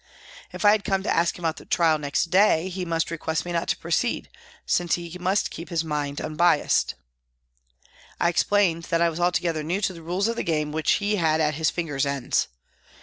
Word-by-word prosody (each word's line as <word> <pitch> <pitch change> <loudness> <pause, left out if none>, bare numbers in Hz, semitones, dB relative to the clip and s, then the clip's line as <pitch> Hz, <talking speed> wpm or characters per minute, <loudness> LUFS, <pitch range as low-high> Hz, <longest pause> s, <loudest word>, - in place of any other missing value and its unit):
If - - -5
I 205 - +8
had 210 -1 +2
come 195 0 0
to - - 0
ask 170 0 +1
him 175 - -7
about 160 - 0
the - - -11
trial 160 -3 +2
next 150 +3 -1
day 190 -2 +4
he 185 0 -4
must 165 -1 -1
request 160 0 -2
me 175 - -4
not 170 0 -1
to - - 0
proceed, 170 +8 -1 0.4
since 175 -1 +1
he 170 0 -8
must 190 +3 0
keep 165 - -8
his 165 -2 0
mind 150 -2 -3
un 155 - -5
biassed. 170 -2 +2 1.2
I - - +3
explained 175 -1 +2
that 170 0 0
I 170 - +3
was 165 +1 -6
altogether 175 -2 +1
new 170 +6 -2
to 195 -2 0
the 165 - -11
rules 180 +5 -1
of 230 0 -2
the - - 0
game 150 -2 -1
which 155 0 +1
he 205 0 0
had 160 -3 +2
at 150 -1 +1
his 160 +2 +1
fingers' 145 -5 -2
ends. 140 -3 0
170 Hz, 215 wpm, -24 LUFS, 160-180 Hz, 1.2 s, I